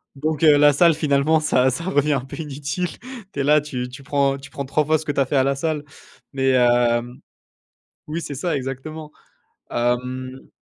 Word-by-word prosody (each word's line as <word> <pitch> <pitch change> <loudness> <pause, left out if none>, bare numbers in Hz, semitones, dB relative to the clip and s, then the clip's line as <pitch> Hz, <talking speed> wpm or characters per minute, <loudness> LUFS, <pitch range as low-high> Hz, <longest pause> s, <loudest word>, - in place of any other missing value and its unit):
Donc 155 +2 -2
heu, 150 -2 +7
la 145 0 +6
salle 170 +3 +5
finalement, 150 +1 +2
ça 130 -4 +2
ça 165 +7 -4
revient 150 -5 +1
un 135 - 0
peu 135 - -9
inutile. 150 +3 -4 0.4
Tu 140 - -5
es - - +1
là, 150 +1 +4
tu 125 -4 -5
tu 135 +2 -11
prends 140 -1 +1
tu 135 0 -12
prends 140 - -5
3 150 +2 0
fois 155 +1 +3
ce 155 - -9
que 145 - -1
tu 140 - -2
as 135 - +3
fait 140 - -3
à 130 - +4
la 135 0 +1
salle 150 0 -2 0.5
mais 135 -1 +1
hem 120 -1 +2 0.9
oui, 160 +3 -3
c'est 140 - -6
ça, 160 +3 -1
exactement. 150 +4 -6 0.6
Mmh 125 +2 -2
140 Hz, 205 wpm, -22 LUFS, 130-150 Hz, 0.9 s, heu